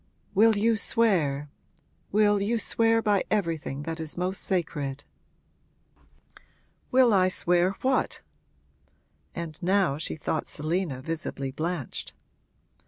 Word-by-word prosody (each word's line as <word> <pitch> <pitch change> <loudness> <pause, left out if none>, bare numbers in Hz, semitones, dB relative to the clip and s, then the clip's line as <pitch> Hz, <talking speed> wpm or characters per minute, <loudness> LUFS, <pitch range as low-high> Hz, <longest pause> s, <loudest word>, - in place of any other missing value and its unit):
'Will 220 +2 +5
you 225 +2 +2
swear 155 -11 +1 0.6
will 205 0 +3
you 225 +4 0
swear 225 0 +2
by 205 -3 +2
everything 165 -8 -2
that 165 +1 -5
is 160 0 -5
most 185 +2 -2
sacred?' 145 -7 -2 1.9
'Will 250 -3 +5
I 185 -2 +4
swear 180 +1 +2
what?' 260 0 0 1.1
And 165 -3 -6
now 185 -5 +2
she - - -1
thought 155 0 -3
Selina 155 -3 -2
visibly 155 -4 -4
blanched. 155 0 -4
180 Hz, 105 wpm, -27 LUFS, 155-205 Hz, 1.9 s, Will